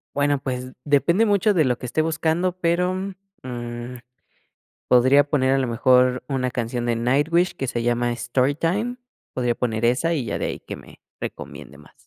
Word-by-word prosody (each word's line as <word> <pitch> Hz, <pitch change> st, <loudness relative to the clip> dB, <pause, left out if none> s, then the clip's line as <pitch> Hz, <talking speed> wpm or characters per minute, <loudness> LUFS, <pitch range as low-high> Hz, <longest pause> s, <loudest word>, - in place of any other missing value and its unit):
Bueno, 145 Hz, -1 st, +2 dB
pues 130 Hz, -1 st, -5 dB
depende 170 Hz, +9 st, +3 dB
mucho 205 Hz, 0 st, +3 dB
de 165 Hz, -, +3 dB
lo 125 Hz, -3 st, +1 dB
que -, -, -8 dB
esté 140 Hz, +6 st, 0 dB
buscando, 160 Hz, +3 st, 0 dB
pero, 180 Hz, +2 st, +1 dB, 0.5 s
mm, 120 Hz, 0 st, -6 dB, 0.9 s
podría 130 Hz, +3 st, +6 dB
poner 135 Hz, -2 st, +1 dB
a -, -, +2 dB
lo 130 Hz, -2 st, 0 dB
mejor 125 Hz, +1 st, +3 dB
una 130 Hz, -3 st, -1 dB
canción 120 Hz, 0 st, -3 dB
de 120 Hz, -1 st, 0 dB
Nightwish 145 Hz, +9 st, +1 dB
que 135 Hz, -, -3 dB
se 120 Hz, -1 st, -2 dB
llama 120 Hz, 0 st, 0 dB
Storytime, 165 Hz, -, 0 dB, 0.4 s
podría 120 Hz, -2 st, 0 dB
poner 115 Hz, -2 st, -1 dB
esa 125 Hz, +8 st, +2 dB
y 140 Hz, -7 st, -2 dB
ya -, -, -2 dB
de -, -, -2 dB
ahí -, -, -5 dB
que -, -, -8 dB
me -, -, -15 dB, 0.2 s
recomiende 70 Hz, -, -8 dB
más. 75 Hz, -, -18 dB
130 Hz, 175 wpm, -23 LUFS, 120-160 Hz, 0.9 s, podría